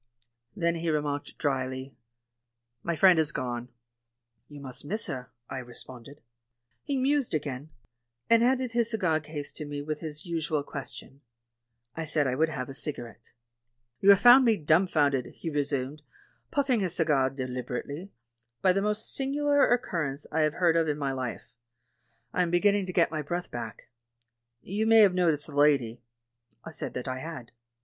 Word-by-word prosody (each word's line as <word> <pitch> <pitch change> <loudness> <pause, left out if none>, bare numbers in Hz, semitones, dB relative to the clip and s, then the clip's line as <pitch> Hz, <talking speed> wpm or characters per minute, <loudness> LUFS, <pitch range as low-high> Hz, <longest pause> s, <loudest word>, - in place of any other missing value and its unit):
Then 170 0 0
he 165 0 -2
remarked 145 -2 -2
drily, 130 -2 -2 0.9
"My 170 +3 -2
friend 180 +1 +6
has 155 -1 +1
gone." 120 -2 -4 0.8
"You 145 -1 -11
must 130 -3 -4
miss 210 +10 -1
her," 125 -1 -5 0.2
I 130 - -5
responded. 125 +2 -10 0.6
He 280 -2 -1
mused 270 - +1
again, 145 -1 -4 0.6
and 230 0 +5
handed 255 0 +2
his 235 -1 +1
cigar 180 -9 +1
case 150 -1 -6
to - - -7
me 145 -1 -5
with 155 0 -4
his 155 0 -7
usual 160 -3 -1
question. 140 0 -8 0.7
I 165 - -3
said 155 -1 +1
I 130 - 0
would 160 +5 +2
havfe 135 -4 -4
a - - -6
cigarette. 120 -6 -5 0.7
"You 200 +5 +8
found 245 +6 +8
me 225 -3 +4
dumfounded," 150 -5 +2
he 165 - -5
resumed, 145 0 -2 0.5
puffing 275 -5 +1
his 185 -4 -1
cigar 145 -5 +2
deliberately, 130 +6 -5 0.5
"by 185 -1 +5
the 195 - +1
most 210 +2 -1
singu 275 +2 -2
lar 285 -2 +4
occurrence 155 - -1
I 160 - 0
have 155 -1 +2
heard 170 -1 +2
of 165 -1 +2
in 150 -1 0
my 140 -2 -1
life; 130 -3 -4 0.9
I 180 - +1
am 175 - +1
beginning 200 +2 +2
to - - -3
get 170 -3 +3
my 155 -1 -2
breath 175 +4 -4
back. 115 -3 -6 0.8
You 210 +4 -1
may 225 0 +7
have 200 -3 +6
noticed 165 -5 +2
the 150 - -8
lady?" 140 -6 +3 0.6
I - - -7
said - - -5
that 125 - -4
I 130 0 -3
had. 155 -5 -7
155 Hz, 165 wpm, -28 LUFS, 135-185 Hz, 0.9 s, You